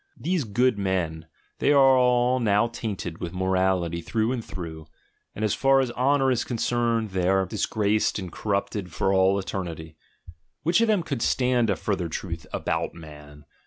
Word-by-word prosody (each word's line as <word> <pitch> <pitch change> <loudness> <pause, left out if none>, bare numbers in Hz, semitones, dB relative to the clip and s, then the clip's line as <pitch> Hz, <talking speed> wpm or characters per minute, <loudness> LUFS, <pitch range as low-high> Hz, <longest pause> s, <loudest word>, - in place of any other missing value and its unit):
These 175 -6 -1
"good 120 +1 +1
men," 85 -5 -2 0.3
they 145 - +3
are 135 -2 +6
all 125 0 +3
now 105 -2 +3
tainted 100 -7 -5
with 85 0 -5
morality 95 -2 0
through 110 +6 -1
and 125 -3 -3
through, 80 -5 -8 0.5
and 110 - -1
as 105 - +1
far 135 0 +3
as 130 -2 0
honour 135 +2 +2
is 125 - +1
concerned 115 -2 -1
they 90 -1 0
are 95 0 +3
disgraced 105 +3 0
and 95 -4 -6
cor 105 +4 -3
rupted 100 -1 -2
for 90 +4 0
all 95 +1 +3
eternity. 85 -5 -5 0.7
Which 170 +7 +3
of 230 - +3
them 210 -5 +2
could 140 -7 -4
stand 125 -2 +2
a 100 - +2
further 95 -4 -2
truth 85 0 -6
"about - - -2
man"? 75 -2 -13
100 Hz, 170 wpm, -25 LUFS, 90-125 Hz, 0.7 s, are